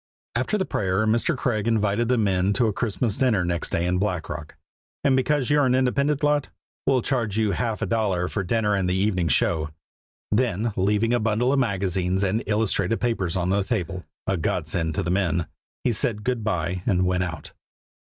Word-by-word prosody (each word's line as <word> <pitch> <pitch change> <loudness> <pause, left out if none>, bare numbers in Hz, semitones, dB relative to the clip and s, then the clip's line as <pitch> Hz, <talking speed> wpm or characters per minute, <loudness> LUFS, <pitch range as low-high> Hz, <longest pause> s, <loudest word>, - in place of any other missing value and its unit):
After 210 - 0
the 190 - 0
prayer 95 +2 0
Mr. 115 +7 +1
Craig 110 -4 -1
invited 110 0 +1
the 125 +1 +2
men 95 -2 +2
to 120 - +2
a 110 - +1
Christmas 110 0 -1
dinner 110 -9 +2
next 85 -1 -2
day 85 - 0
in 90 +1 +1
Black 90 -5 -2
Rock. 75 - -7 0.5
"And 135 -2 +4
because 135 +1 +1
you 145 - +4
are 145 - +4
an 125 - +3
independent 140 +3 +1
lot, 145 -1 +2 0.4
we'll 130 -3 +3
charge 115 -6 -1
you 110 -2 +2
half 110 +3 -2
a - - +1
dollar 100 -6 0
for 100 - -2
dinner 105 +2 +1
and 95 -2 +1
the 90 - +1
evening 95 -3 +1
show." 80 +3 +2 0.6
Then 115 -1 +1
leaving 105 +5 +1
a 120 - +3
bundle 110 +4 +1
of 140 - +2
magazines 95 -4 0
and 100 +4 +1
illustrated 105 -1 0
papers 100 -7 -1
on 90 0 0
the 100 +1 +2
table 90 -1 -3 0.2
a 95 - 0
godsend 80 0 -1
to 95 - 0
the 85 - -1
men 90 -3 +1 0.4
he 120 - +2
said 105 0 0
good 125 -2 -1
by 90 -3 -1
and 90 -1 +2
went 90 0 +1
out. 85 -4 -6
105 Hz, 200 wpm, -24 LUFS, 90-120 Hz, 0.6 s, And